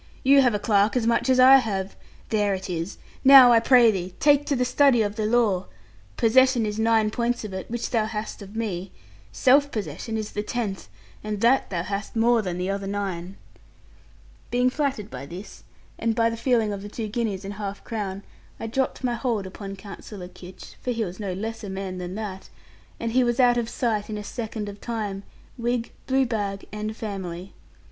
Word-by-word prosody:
You 275 +1 +6
have 245 -5 +3
a - - -1
clerk 205 +1 +2
as 245 -3 +1
much 235 +2 +1
as 255 -1 +4
I 260 +2 +9
have. 195 -6 -2 0.3
There 205 -2 +1
it 185 0 -6
is. 170 +2 -4 0.3
Now 265 -2 +10
I 230 - +6
pray 240 -1 +6
thee, 185 -2 -5
take 290 0 +4
to 285 - +1
the 250 -1 +1
study 250 -2 +4
of 205 0 -3
the 215 -1 -1
law. 215 -5 +2 0.5
Possession 255 0 +4
is 210 +1 -3
nine 220 -1 +3
points 240 +1 -1
of 210 -3 -6
it, 190 - -6
which 240 0 -3
thou 225 -3 +2
hast 215 0 -5
of 200 +1 -11
me. 195 -5 -3 0.4
Self 280 - +4
possession 220 +1 -4
is 215 -1 -4
the 210 - -2
tenth, 210 -3 -4 0.3
and 210 -1 -3
that 250 +3 +3
thou 170 -3 -2
hast 200 +4 -5
more 230 +1 +3
than 180 -4 -4
the 180 +1 -2
other 195 0 -2
nine.' 195 -2 -4 1.1
Being 250 +1 +2
flattered 270 -8 -2
by 135 +2 -7
this, 180 +7 -10 0.3
and 225 -1 0
by 230 0 +2
the - - -3
feeling 230 -3 +1
of 200 - -5
the 205 - -8
two 220 +1 -4
guineas 210 -3 -2
and 200 - -5
half 200 -1 -6
crown, 200 -4 -4 0.4
I - - -5
dropped 260 +4 -2
my 245 -1 +1
hold 230 -4 -1
upon 195 +1 -7
Counsellor 195 -1 -9
Kitch 180 0 -12
(for - - -4
he 230 -2 0
was 180 +1 -8
no 200 -3 -3
less 220 +4 -5
a 200 - -5
man 190 -1 -5
than 180 +1 -5
that), 200 -3 -6 0.5
and 230 0 -2
he 255 +2 +3
was 240 0 0
out 245 -1 +5
of 235 -1 -3
sight 225 -4 -1
in 215 - -4
a 210 - -5
second 220 -1 -5
of 200 0 -9
time, 210 -4 -3 0.4
wig, 240 0 -1 0.2
blue 265 0 +3
bag, 205 -4 -3
and 215 +1 -5
family. 190 -3 -6
215 Hz, 205 wpm, -25 LUFS, 195-240 Hz, 1.1 s, Now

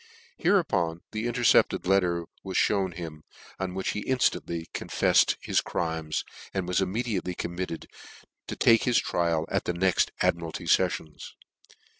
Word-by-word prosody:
Hereupon 85 - +1
the 110 +2 -2
intercepted 120 -5 +3
let 95 +2 +5
ter 85 -2 -1 0.2
was 95 -1 -3
(hewn 95 -3 +2
him, 80 -3 -7 0.4
on 95 -1 -3
which 95 - -2
he 105 - -3
inftantly 85 -10 0
confef - - -5 0.2
fcd - - +5
his - - +1
crimes, 80 -2 -2 0.3
and 95 -2 -1
was 90 +1 +1
immediately 95 -2 -2
committed 85 -1 -4 0.6
to - - -4
take 115 -1 +4
his 125 -2 +3
trial 85 -2 +1
at - - 0
the 90 - -1
next 90 +1 +2
Admiralty 85 +1 -1
feffions. 80 -3 0
90 Hz, 145 wpm, -27 LUFS, 85-100 Hz, 0.6 s, let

